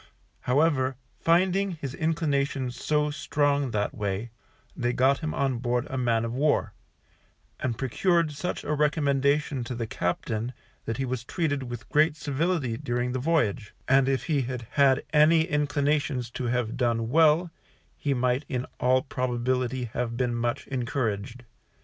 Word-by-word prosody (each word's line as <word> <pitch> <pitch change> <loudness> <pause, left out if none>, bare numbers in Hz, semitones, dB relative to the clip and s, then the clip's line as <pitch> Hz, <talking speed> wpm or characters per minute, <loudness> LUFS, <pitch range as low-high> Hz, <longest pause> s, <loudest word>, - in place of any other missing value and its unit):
However, 135 -1 +2 0.2
finding 185 +2 +2
this 135 -3 -5
inclinations 140 -5 -1
so 150 +3 0
strong 145 -1 0
that 105 -2 -1
way, 105 +2 -3 0.4
they 120 -3 0
got 135 +2 +3
him 155 -1 -3
on 135 -3 0
board 120 0 0
a - - -3
man 120 -3 +1
of 115 - -4
war, 145 +4 +1 0.9
and 120 -3 -2
procured 165 +5 +1
such 180 +5 -4
a 150 - -1
recommendation 145 -2 +1
to 125 - -4
the 115 -1 -3
captain 110 +5 -2 0.3
that 115 - -3
he 135 - -1
was 125 -2 -3
treated 145 0 -1
with 120 -1 -7
great 155 +1 +3
civility 145 -4 -1
during 125 -2 -2
the 130 - -2
voyage, 125 -8 0
and 135 0 +4
if 135 -1 0
he 150 -4 +1
had 125 -2 -4
had 140 -1 +4
any 155 +2 +6
inclinations 145 -4 0
to 125 - -4
have 120 -2 -1
done 115 -2 0
well, 160 +2 +4 0.4
he 140 -2 -1
might 125 +2 +1
in 125 -1 -2
all 130 +1 +3
probability 125 -1 -1
have 120 -1 -2
been 125 -1 0
much 120 0 -2
encouraged. 120 -3 -3
130 Hz, 150 wpm, -27 LUFS, 120-150 Hz, 0.9 s, any